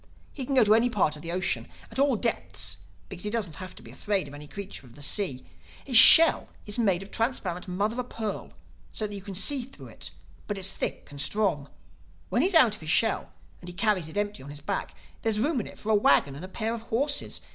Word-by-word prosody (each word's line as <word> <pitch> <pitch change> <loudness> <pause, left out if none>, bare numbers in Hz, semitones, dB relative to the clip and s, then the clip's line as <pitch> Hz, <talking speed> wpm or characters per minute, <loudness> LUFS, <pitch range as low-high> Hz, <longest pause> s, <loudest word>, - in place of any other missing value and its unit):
He 270 - -4
can 275 - -2
go 255 - +7
to 210 0 +4
any 230 +2 +4
part 190 -9 +1
of 150 - -11
the 170 - -6
ocean, 185 +2 0 0.2
at - - -6
all 275 -2 +3
depths 95 - -1 0.3
because 175 - -7
he 210 - -1
doesn't 210 -9 -3
have 185 -1 -8
to - - -13
be - - -12
afraid 200 -6 -1
of 140 - -12
any 145 +1 -10
creature 195 -6 -8
in 120 - -17
the 145 - -8
sea. 160 -6 -1 0.4
His 260 - -3
shell 320 +8 +9 0.2
is 210 +3 -3
made 195 -5 +1
of 195 - -14
transparent 205 -7 -2
mother 205 +6 -1
o' - - 0
pearl 220 -4 -5 0.4
so 215 - -3
that 205 - -6
you 200 - -6
can 195 0 -8
see 265 +9 +3
through 260 +3 -11
it; - - -7 0.4
but 205 - -3
it's 195 0 -2
thick - - -4
and 140 -1 -5
strong. 165 -6 0 0.6
When 240 - +1
he 345 - +4
is 380 - -1
out 250 -10 +7
of 210 - -9
his 155 - -6
shell 210 +8 +2 0.3
and 180 - -13
he - - -7
carries 190 -4 +1
it 160 - -8
empty 205 -3 -2
on 135 - -10
his 145 0 -9
back, 150 - -3 0.3
there 225 - 0
is 210 -1 0
room 285 +3 +1
in 215 - -4
it - - -12
for 220 - -3
a - - +4
wagon 140 -8 +4
and 145 - -9
a - - -6
pair 220 +4 -3
of 230 - -5
horses. 280 +6 -1
205 Hz, 255 wpm, -27 LUFS, 170-230 Hz, 0.6 s, shell